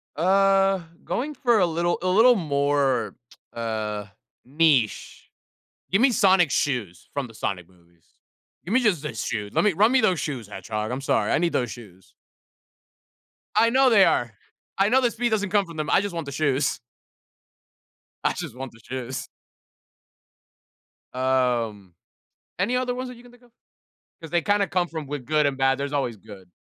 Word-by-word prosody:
Uh, 195 Hz, +3 st, +3 dB, 0.2 s
going 290 Hz, +5 st, -3 dB
for 245 Hz, -5 st, +2 dB
a 180 Hz, -, +4 dB
little 170 Hz, +1 st, 0 dB
a 185 Hz, -, -2 dB
little 225 Hz, +7 st, +5 dB
more, 140 Hz, -, 0 dB, 0.4 s
uh, 110 Hz, -2 st, -3 dB, 0.4 s
niche. 140 Hz, -5 st, 0 dB, 0.6 s
Give 195 Hz, +4 st, +3 dB
me 265 Hz, +1 st, +5 dB
Sonic 190 Hz, -, +4 dB
shoes 115 Hz, -, -2 dB
from 140 Hz, -3 st, -3 dB
the 115 Hz, -, -15 dB
Sonic 90 Hz, -5 st, -4 dB
movies. 85 Hz, -2 st, -27 dB, 0.6 s
Give 185 Hz, -, -3 dB
me 260 Hz, -, +4 dB
just 195 Hz, -, +1 dB
his 120 Hz, -7 st, -4 dB
shoes. 105 Hz, -1 st, -4 dB
Let -, -, +2 dB
me 210 Hz, -2 st, +3 dB
run 210 Hz, +7 st, +4 dB
me 265 Hz, -1 st, +4 dB
those 185 Hz, -6 st, +2 dB
shoes, 125 Hz, -8 st, -4 dB
Hedgehog. 105 Hz, +2 st, -5 dB
I'm 130 Hz, +2 st, -3 dB
sorry. 135 Hz, -, 0 dB
I -, -, +3 dB
need 170 Hz, +1 st, 0 dB
those 125 Hz, -3 st, -1 dB
shoes. 95 Hz, -6 st, -13 dB, 1.4 s
I 230 Hz, -, +5 dB
know 260 Hz, +2 st, +4 dB
they 205 Hz, -5 st, +6 dB
are. 120 Hz, -1 st, +1 dB, 0.5 s
I 195 Hz, +1 st, +3 dB
know 260 Hz, +3 st, +4 dB
the 240 Hz, -2 st, +2 dB
speed 240 Hz, +1 st, -1 dB
doesn't 205 Hz, -3 st, 0 dB
come 200 Hz, 0 st, +2 dB
from 170 Hz, -2 st, -11 dB
them. 155 Hz, -1 st, -3 dB
I -, -, +4 dB
just 205 Hz, -2 st, -4 dB
want 165 Hz, -2 st, -4 dB
the 140 Hz, -, -7 dB
shoes. 140 Hz, -1 st, 0 dB, 1.4 s
I -, -, +2 dB
just -, -, -6 dB
want 130 Hz, -1 st, -7 dB
the 115 Hz, -, -19 dB
shoes. 130 Hz, +2 st, -5 dB, 1.9 s
Um, 120 Hz, -7 st, -1 dB, 0.7 s
any 210 Hz, +7 st, +1 dB
other 250 Hz, -1 st, -1 dB
ones 255 Hz, +1 st, -5 dB
that 250 Hz, -, -10 dB
you 240 Hz, -, -15 dB
can 245 Hz, 0 st, -17 dB
think 245 Hz, 0 st, -21 dB
of? 240 Hz, -, -23 dB, 0.7 s
'Cause 165 Hz, -2 st, -10 dB
they 175 Hz, 0 st, +1 dB
kinda 205 Hz, +4 st, +2 dB
come 175 Hz, -1 st, 0 dB
from 160 Hz, -2 st, -6 dB
w 145 Hz, -1 st, -5 dB
good 150 Hz, +3 st, +1 dB
and 140 Hz, -1 st, -1 dB
bad. 135 Hz, 0 st, +2 dB
There's 140 Hz, +1 st, -4 dB
always 135 Hz, -5 st, -1 dB
good. 100 Hz, -3 st, -14 dB
150 Hz, 180 wpm, -24 LUFS, 120-200 Hz, 1.9 s, they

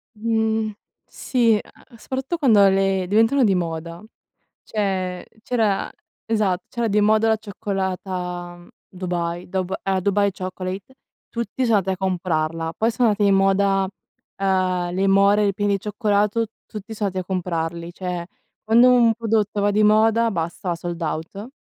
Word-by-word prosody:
Mhmm, 220 Hz, -1 st, 0 dB, 0.3 s
sì 230 Hz, -4 st, +1 dB
e -, -, -4 dB, 0.3 s
e 230 Hz, -, -16 dB
soprattutto 265 Hz, +8 st, -4 dB
quando 220 Hz, -9 st, +5 dB
le 195 Hz, -1 st, +2 dB
diventano 225 Hz, +6 st, +3 dB
di 195 Hz, -2 st, +3 dB
moda. 170 Hz, +1 st, -4 dB, 0.6 s
Cioè, 190 Hz, -4 st, -2 dB, 0.2 s
c'era 220 Hz, -5 st, 0 dB, 0.4 s
esatto, 200 Hz, -5 st, 0 dB
c'era 235 Hz, -1 st, -1 dB
di 210 Hz, +1 st, +2 dB
moda 215 Hz, +1 st, +3 dB
la 220 Hz, -, +3 dB
cioccolata 185 Hz, -4 st, -4 dB, 0.2 s
Dubai, 175 Hz, -1 st, -4 dB
Dub 190 Hz, 0 st, -2 dB
a 190 Hz, -1 st, 0 dB
Dubai 200 Hz, +1 st, +2 dB
Chocolate, 185 Hz, +5 st, -6 dB, 0.3 s
tutti 235 Hz, +2 st, -3 dB
sono 225 Hz, -3 st, +4 dB
andati 190 Hz, 0 st, 0 dB
a -, -, -20 dB
comprarla, 165 Hz, -3 st, -1 dB
poi 225 Hz, +2 st, +2 dB
sono 235 Hz, 0 st, +2 dB
andati 205 Hz, 0 st, +1 dB
di -, -, +4 dB
moda, 195 Hz, 0 st, +2 dB, 0.5 s
ehm, 185 Hz, -2 st, 0 dB
le 195 Hz, +1 st, +1 dB
more 200 Hz, +2 st, +4 dB
ripiene 200 Hz, +1 st, 0 dB
di 195 Hz, -, 0 dB
cioccolato, 210 Hz, +1 st, 0 dB, 0.2 s
tutti 215 Hz, +1 st, -8 dB
son 210 Hz, -1 st, -1 dB
andati 185 Hz, -1 st, -3 dB
a -, -, -36 dB
comprarli. 170 Hz, -1 st, -3 dB
Cioè, 180 Hz, -2 st, -4 dB, 0.4 s
quando 235 Hz, +3 st, +6 dB
un 235 Hz, -2 st, +5 dB
prodotto 215 Hz, -2 st, 0 dB
va 205 Hz, 0 st, +2 dB
di 210 Hz, +1 st, +2 dB
moda, 225 Hz, +2 st, +4 dB
basta 170 Hz, 0 st, -3 dB
sold 170 Hz, 0 st, -6 dB
out. 165 Hz, -, -4 dB
195 Hz, 150 wpm, -22 LUFS, 180-220 Hz, 0.6 s, quando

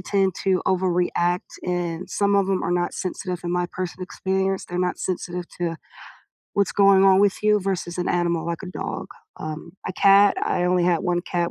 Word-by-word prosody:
tend 190 Hz, 0 st, +1 dB
to 190 Hz, -2 st, +2 dB
overreact, 180 Hz, -1 st, +1 dB
and 175 Hz, -1 st, -2 dB
some 200 Hz, 0 st, +1 dB
of 195 Hz, -1 st, +2 dB
'em 190 Hz, -1 st, 0 dB
are -, -, -1 dB
not 175 Hz, 0 st, 0 dB
sensitive 185 Hz, -2 st, -4 dB
in 175 Hz, -, -2 dB
my 180 Hz, 0 st, 0 dB
person 185 Hz, +1 st, -5 dB
experience, 190 Hz, +1 st, -1 dB
they're 175 Hz, -, -5 dB
not 180 Hz, 0 st, 0 dB
sensitive 180 Hz, -1 st, -3 dB
to 170 Hz, -2 st, -2 dB, 0.8 s
what's 200 Hz, -1 st, +2 dB
going 195 Hz, -1 st, +5 dB
on 190 Hz, -1 st, +6 dB
with 205 Hz, 0 st, +2 dB
you 210 Hz, 0 st, +4 dB
versus 185 Hz, -2 st, -3 dB
an 180 Hz, -, -1 dB
animal 170 Hz, -2 st, 0 dB
like 170 Hz, +1 st, -3 dB
a -, -, -6 dB
dog, 180 Hz, -, -5 dB, 0.3 s
um, 155 Hz, +2 st, -6 dB, 0.2 s
a -, -, -3 dB
cat 200 Hz, +2 st, +5 dB
I -, -, 0 dB
only 180 Hz, -1 st, +2 dB
had 175 Hz, -2 st, +2 dB
1 175 Hz, -2 st, 0 dB
cat, 175 Hz, -2 st, -1 dB
180 Hz, 195 wpm, -23 LUFS, 175-190 Hz, 0.8 s, on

